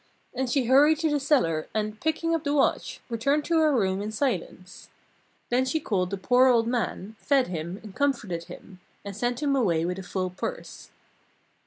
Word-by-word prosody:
And 260 0 -2
she 265 -1 +1
hurried 285 +5 +5
to 320 -2 +1
the 295 - +1
cellar 240 - +1
and, 215 0 -2
picking 320 +1 0
up 325 -2 -1
the 290 -1 0
watch, 285 - 0
returned 275 +6 0
to 335 -1 +2
her 310 -1 +4
room 195 -7 +1
in 210 +1 -4
silence. 190 - -4 0.6
Then 250 +2 +2
she 260 +5 -1
called 190 - -1
the 200 - -3
poor 250 +7 +4
old 235 -3 +4
man, 225 -3 -3
fed 275 -6 +2
him, 170 +2 -5
and 210 -3 -10
comforted 215 -12 -1
him, 180 +1 -12 0.3
and 200 -1 -6
sent 245 +6 -2
him 280 -1 +2
away 170 -11 +1
with 180 +2 -3
a - - -5
full 185 0 -3
purse. - - -7
240 Hz, 190 wpm, -26 LUFS, 190-280 Hz, 0.6 s, hurried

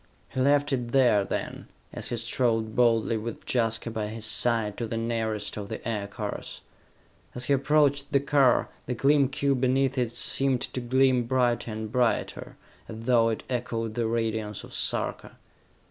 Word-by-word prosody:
He - - -5
left 145 +1 +3
it 120 -2 -2
there 120 -7 +4
then, - - -5 0.3
as - - -5
he 120 - -2
strode 115 -1 0
boldly, 115 -2 +3
with 110 +1 -6
Jaska 115 -1 0
by 110 -1 -3
his 110 +1 -5
side, 110 -2 +1
to 115 - -3
the 115 - -3
nearest 115 -2 -2
of 100 -1 -6
the - - -6
aircars. 105 -3 -5 0.7
As 125 +1 -2
he 140 - +2
approached 140 0 +2
the 140 - +4
car, 140 -3 +3 0.2
the 125 - -2
gleam 140 +2 +3
cube 140 -2 0
beneath 135 +1 +2
it 120 -2 0
seemed 135 +1 +1
to 130 - -3
gleam 130 0 +2
brighter 120 -1 +1
and 110 0 -5
brighter, 120 -1 -1 0.3
as 115 0 -8
though 115 -2 +3
it 110 - -3
echoed 115 -3 -3
the 115 0 -1
radiance 110 -2 -2
of - - -12
Sarka. - - -1
120 Hz, 165 wpm, -27 LUFS, 115-130 Hz, 0.7 s, there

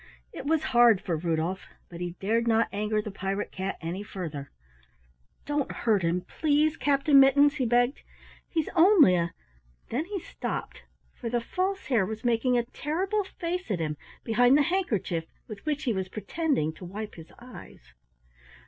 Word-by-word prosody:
It - - -7
was 315 0 +2
hard 240 -4 +6
for 180 -3 -2
Rudolf, 165 +3 -2 0.2
but 170 0 -10
he 175 -1 -3
dared 230 +4 0
not 230 0 +3
anger 210 +1 -1
the 210 - -5
pirate 195 +1 -3
cat 190 +1 -4
any 175 +4 -4
further. 160 -9 -6 1.0
"Don't 290 -1 -1
hurt 215 -4 +1
him, 170 +1 0 0.2
please, 305 0 +3
Captain 280 -1 +4
Mittens," 285 +2 +5
he 255 -4 0
begged. 245 +4 +2 0.5
"He's 320 -3 -1
only 345 - +6
a 170 -1 -1 0.3
" - - -35
Then 275 +7 -1
he 400 +1 -4
stopped, - - -5 0.3
for 235 - -6
the 240 +1 +1
False 375 +10 -2
Hare 225 -8 +2
was 220 +2 -6
making 245 +1 +2
a 240 - +1
terrible 365 - -2
face 360 -2 -5
at 200 - 0
him 155 -2 -2 0.3
behind 245 +4 +4
the 295 - +4
handkerchief 210 - -1 0.2
with 210 -3 -9
which 300 -1 -1
he 240 - +1
was 190 -1 -3
pretending 215 - -1
to 170 - -13
wipe 205 +4 -6
his 165 -1 -12
eyes. 240 - -13
230 Hz, 170 wpm, -27 LUFS, 185-290 Hz, 1.0 s, hard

